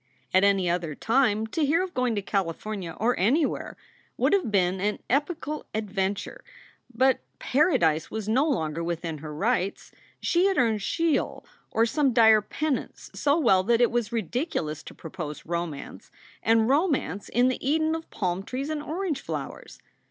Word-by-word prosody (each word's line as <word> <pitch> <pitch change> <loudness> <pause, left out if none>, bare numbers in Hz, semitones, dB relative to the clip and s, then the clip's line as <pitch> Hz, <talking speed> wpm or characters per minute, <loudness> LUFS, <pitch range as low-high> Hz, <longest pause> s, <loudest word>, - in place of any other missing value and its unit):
At 185 +1 +5
any 195 -2 +3
other 170 -3 -1
time, 225 - +2
to 300 +8 -2
hear 320 +5 +3
of 370 -1 -6
going 250 -3 0
to 205 - -2
California, 190 -1 -3
or 235 +3 +2
anywhere, 275 - +1 0.4
would - - +2
have 390 - +2
been 185 -2 +2
an 210 +1 0
epochal 300 +2 -1
adven 200 -2 -1
ture. - - -9 0.5
But 260 +2 +3 0.2
Paradise 250 - +2
was 220 -2 -5
no 265 +8 +2
longer 160 - -1
within 165 -2 -3
her 155 +1 -7
rights. 195 +4 -1 0.3
She 350 +2 +2
had 390 - 0
earned 225 -4 +2
Sheol 330 - 0 0.2
or 225 - +2
some 270 +2 +1
dire 220 -2 +6
penance 295 +6 -3
so 285 +1 +2
well 230 - +4
that 235 +1 +3
it 240 - +4
was 235 -3 0
lidiculous 225 - -2
to - - -10
propose 155 -2 -7
romance, 170 -4 -5 0.3
and 225 0 +3
romance 270 - 0
in 245 +2 +3
the 255 - -3
Eden 315 +1 +2
of 325 0 -5
palm 180 -1 -2
trees 265 +8 -4
and 305 -1 -2
orange 320 -1 -3
flowers. - - -6
225 Hz, 165 wpm, -26 LUFS, 185-285 Hz, 0.5 s, dire